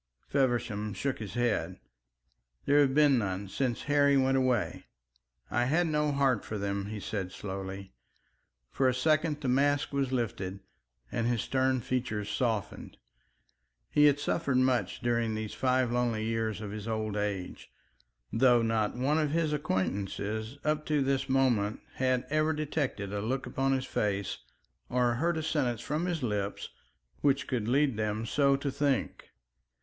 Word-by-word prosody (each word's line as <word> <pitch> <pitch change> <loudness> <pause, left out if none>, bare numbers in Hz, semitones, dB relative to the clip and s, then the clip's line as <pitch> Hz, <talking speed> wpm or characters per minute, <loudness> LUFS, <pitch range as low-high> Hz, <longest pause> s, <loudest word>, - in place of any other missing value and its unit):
Feversham 120 -6 0
shook 140 -1 -2
his 105 0 -7
head. 105 -7 0 0.9
"There 145 +1 +4
have 135 -2 +2
been 145 -4 +5
none 100 -1 -3
since 125 +2 -1
Harry 145 -1 +4
went 135 0 +3
away. 130 -4 0 0.7
I 120 +1 +2
had 160 +7 +2
no 150 -2 +1
heart 135 -5 +2
for 110 - -5
them," 100 0 -2
he 105 0 -5
said 95 -3 -4
slowly. 95 -2 -6 0.8
For 130 -1 +2
a 125 - 0
second 155 +2 +1
the 135 - -2
mask 140 +3 +2
was 135 -2 0
lifted 100 -6 -2 0.5
and 115 - 0
his 120 -3 0
stern 130 -1 +1
features 115 -4 -2
softened. 115 -5 -2 0.9
He 150 - +5
had 145 -1 +5
suffered 145 -2 0
much 125 -7 +1
during 115 -2 0
these 110 -1 -4
five 130 -2 +1
lonely 120 -3 0
years 110 -1 -1
of 105 -2 -5
his 105 +1 -6
old 110 -2 -2
age, 100 -3 -4 0.6
though 120 0 +5
not 110 -2 0
one 145 +5 +2
of 150 -2 +1
his 155 0 0
acquaintances 110 -2 -2
up 150 0 0
to 150 -2 +2
this 135 0 0
moment 120 -6 +2 0.2
had 130 -1 +1
ever 155 +1 +2
detected 145 -9 -2
a 100 - -2
look 125 +5 -2
upon 135 0 0
his 130 -1 -1
face 100 -2 -1 0.5
or 125 -1 +2
heard 165 +7 0
a 160 - -2
sentence 130 -7 0
from 155 +8 -2
his 165 -5 -2
lips 105 -3 -2 0.5
which 140 -1 +2
could 115 -5 -2
lead 135 -1 +2
them 110 +1 -1
so 140 +3 +3
to 140 0 -2
think. 140 -2 -1
125 Hz, 155 wpm, -30 LUFS, 105-140 Hz, 0.9 s, been